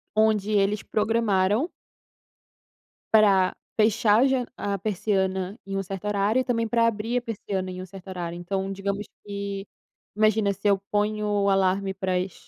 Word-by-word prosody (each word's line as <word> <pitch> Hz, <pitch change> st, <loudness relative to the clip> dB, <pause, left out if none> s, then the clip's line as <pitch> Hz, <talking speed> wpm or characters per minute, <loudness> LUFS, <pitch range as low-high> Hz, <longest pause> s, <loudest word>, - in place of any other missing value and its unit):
onde 215 Hz, -1 st, +2 dB
eles 205 Hz, 0 st, +2 dB
programaram 215 Hz, -, +1 dB, 1.4 s
pra 200 Hz, -4 st, +5 dB, 0.2 s
fechar 215 Hz, 0 st, +4 dB
a -, -, +5 dB
ja 260 Hz, -2 st, +1 dB
a 200 Hz, -1 st, -2 dB
persiana 190 Hz, -1 st, -1 dB
em 195 Hz, 0 st, -5 dB
um 195 Hz, -, 0 dB
certo 195 Hz, +1 st, -6 dB
horário 210 Hz, +4 st, +2 dB
e -, -, -1 dB
também 230 Hz, -3 st, 0 dB
para 230 Hz, 0 st, +3 dB
abrir 230 Hz, +2 st, 0 dB
a -, -, 0 dB
persiana 195 Hz, -5 st, -4 dB
em 185 Hz, 0 st, -6 dB
um -, -, -6 dB
certo 190 Hz, +1 st, -12 dB
horário. 175 Hz, -2 st, -5 dB
Então 190 Hz, +2 st, -3 dB
digamos 200 Hz, +1 st, -3 dB, 0.2 s
que, 200 Hz, -1 st, -5 dB, 0.5 s
imagina 215 Hz, -1 st, +3 dB
se 200 Hz, +2 st, -3 dB
eu 200 Hz, -, +4 dB
ponho 210 Hz, +1 st, 0 dB
o 205 Hz, -1 st, +2 dB
alarme 195 Hz, 0 st, +2 dB
para 190 Hz, -1 st, -2 dB
as 185 Hz, 0 st, -2 dB
200 Hz, 165 wpm, -25 LUFS, 190-215 Hz, 1.4 s, pra